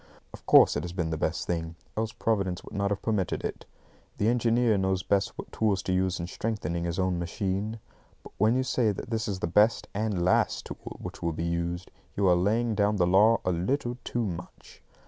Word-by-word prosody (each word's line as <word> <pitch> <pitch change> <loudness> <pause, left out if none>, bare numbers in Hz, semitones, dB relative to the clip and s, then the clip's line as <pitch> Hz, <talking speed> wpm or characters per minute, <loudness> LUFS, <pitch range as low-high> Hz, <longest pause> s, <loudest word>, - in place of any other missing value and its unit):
Of - - -13
course, - - +7
it - - -1
has 90 0 -5
been 85 -3 -2
the - - 0
best 80 +1 -1
thing, 85 -1 -3 0.2
else 110 +1 -1
Providence 95 -7 -1
would - - -12
not 100 -1 0
have 100 -1 -2
permitted 105 -5 -1
it. - - -5 0.5
The 105 - +2
engineer 120 -1 +3
knows 95 -1 0
best 100 0 0
what - - -8
tools 100 -4 0
to 95 - -1
use 95 0 +1
in 85 - -3
strengthening 85 -4 -3
his 85 0 -2
own 95 -2 0
machine. 95 +5 -2 0.5
But - - -13
when 110 +3 +4
you 130 - +2
say 125 -4 +1
that 100 - -8
this 110 -1 -1
is 95 -2 -3
the - - +1
best 105 +6 +3
and 100 -4 -1
last 90 - +2
tool - - -8
which - - -8
will 85 -1 -1
be 85 +2 -3
used, 85 +1 -2 0.2
you 100 -1 +2
are 90 - +6
laying 110 +6 +1
down 105 0 +2
the 90 -3 +3
law 105 +6 +5
a 90 - +2
little 120 - -1
too 120 -1 -1
much. 90 -3 -8
95 Hz, 215 wpm, -28 LUFS, 90-110 Hz, 0.5 s, course